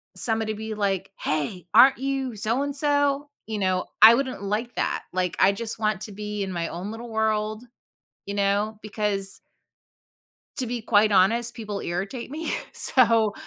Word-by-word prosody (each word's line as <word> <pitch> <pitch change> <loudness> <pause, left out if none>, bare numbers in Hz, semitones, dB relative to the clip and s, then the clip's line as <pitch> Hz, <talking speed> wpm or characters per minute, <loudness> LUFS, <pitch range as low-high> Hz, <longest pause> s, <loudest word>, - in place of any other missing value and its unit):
somebody 220 -1 0
be 220 +1 -5
like, 195 -3 -1
"Hey, 160 +4 -2
aren't 265 +4 +7
you 265 -2 -2
so-and-so?" 285 +5 0 0.2
you 220 -1 -3
know, 185 -2 0 0.2
I 225 +2 +11
wouldn't 255 -5 -2
like 220 +4 -2
that, - - -1
like, 180 -1 -1
I 190 +1 +6
just 225 +2 -5
want 215 -2 0
to 215 - -6
be 210 0 -4
in 190 - -4
my 170 -1 -2
own 185 +5 -6
little 230 +1 -8
world, 215 0 -1 0.6
you 200 - -5
know, 205 +2 0
because 205 -2 -3 1.2
to 255 - +1
be 240 -1 -3
quite 215 -1 +3
honest, 225 +5 +3
people 210 -3 -5
irritate 195 +9 -4
me, 315 +3 -3 0.2
so, 230 -4 +3
215 Hz, 155 wpm, -25 LUFS, 200-235 Hz, 1.2 s, I